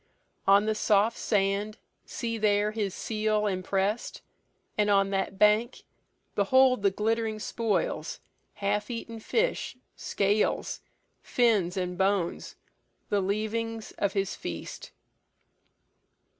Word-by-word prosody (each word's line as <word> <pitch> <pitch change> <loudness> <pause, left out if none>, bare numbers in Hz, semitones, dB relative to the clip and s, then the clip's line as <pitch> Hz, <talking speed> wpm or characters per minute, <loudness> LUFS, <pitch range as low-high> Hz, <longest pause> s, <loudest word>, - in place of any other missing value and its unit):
"On 200 +1 +6
the 220 - +1
soft 215 +1 +2
sand, 205 +1 0 0.3
See 230 -2 -3
there 210 0 +2
his 210 -4 -2
seal 215 -1 0
impress'd! 195 +2 -1 0.5
And 210 -1 +2
on 195 -1 +3
that 195 0 -1
bank 210 +3 +3 0.5
Behold 255 +4 +4
the 200 - +4
glitt'ring 220 +2 -1
spoils, 230 - -2 0.4
half 205 +1 -1
eaten 230 -1 -5
fish, 465 - -1 0.2
Scales, 205 +1 0 0.4
fins, 205 -7 +2
and 180 0 -3
bones, 190 -3 0 0.5
the 205 -1 +2
leavings 220 +3 -2
of 200 - +1
his 195 -1 -1
feast." 85 -1 -7
210 Hz, 105 wpm, -28 LUFS, 195-225 Hz, 0.5 s, On